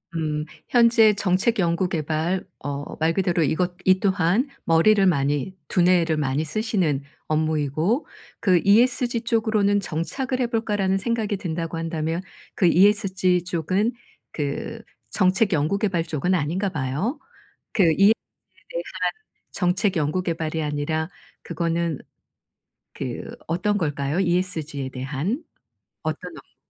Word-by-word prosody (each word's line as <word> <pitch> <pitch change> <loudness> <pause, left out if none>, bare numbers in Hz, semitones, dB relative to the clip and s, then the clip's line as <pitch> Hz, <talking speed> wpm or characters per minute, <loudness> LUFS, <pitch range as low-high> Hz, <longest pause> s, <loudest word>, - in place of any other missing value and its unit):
음 150 -1 -1 0.2
현재 230 -3 +5
정책 200 +3 +1
연구 175 +1 +1
개발 160 +4 -1 0.2
어 145 0 -4
말 160 +1 +2
그대로 175 -3 +1
이것 175 +5 0
이 185 0 +5
또한 195 - +2 0.2
머리를 195 +5 +4
많이, 145 +1 +1
두뇌를 175 -3 +3
많이 145 +1 0
쓰시는 180 - 0 0.2
업무이고 155 - 0 0.3
그 185 -4 +4
ESG 240 +3 +3
쪽으로는 220 -3 +2
'정착을 255 - -3
해 245 - +1
볼까.'라는 205 -5 0
생각이 220 -1 -1
든다고 165 -2 -4
한다면 165 +1 -2 0.3
그 185 - +2
ESG 190 -1 +3
쪽은 185 +6 0 0.4
그 150 +10 -4 0.3
정책 190 +1 +2
연구 155 +6 +1
개발 195 -6 0
쪽은 165 +3 -1
아닌가 180 +5 0
봐요. 155 - -2 0.5
그 195 - +3
ESG에 195 +7 +5 0.5
대한 - - -3 0.7
정책 185 +1 +1
연구 155 +4 0
개발이 160 -2 -2
아니라 150 +2 -2 0.3
그거는 170 -3 -1 0.9
그 - - -5 0.2
어떤 200 +5 0
걸까요? 145 -1 -1
ESG에 170 -6 -1
대한 145 - -3 0.6
어떤 - - -4
업무 - - -16
180 Hz, 265 characters per minute, -24 LUFS, 155-205 Hz, 0.9 s, 현재